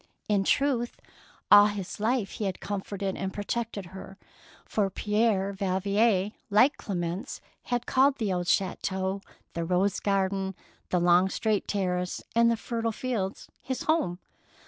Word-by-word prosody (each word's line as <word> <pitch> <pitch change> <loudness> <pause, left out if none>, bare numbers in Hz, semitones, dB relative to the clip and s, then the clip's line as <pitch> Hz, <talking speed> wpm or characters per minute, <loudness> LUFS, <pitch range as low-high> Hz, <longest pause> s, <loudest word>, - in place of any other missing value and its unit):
In 205 -2 +2
truth, 250 +1 +1 0.5
all 205 0 +9
his 205 -1 -5
life 220 -1 0
he 210 - -4
had 190 -2 -3
comforted 195 -1 -3
and 190 0 -3
protected 205 0 -3
her, 190 0 -9 0.5
for 205 -3 0
Pierre 210 -1 +1
Valvier, 195 +1 +1 0.2
like 220 +8 +5
Clemence, 175 0 -4 0.3
had 245 -1 -1
called 270 +1 +3
the 210 -5 -1
old 175 -1 -2
chateau, 190 +1 0 0.3
the 170 - -2
rose 185 +4 +1
garden, 195 -1 0 0.3
the 180 - +2
long 175 +2 +4
straight 215 0 0
terrace, 180 -2 -1
and 235 0 +5
the 230 - +1
fertile 230 0 -2
fields 215 -5 -3
his 260 -1 -4
home. 315 - +1
200 Hz, 140 wpm, -28 LUFS, 190-225 Hz, 0.5 s, all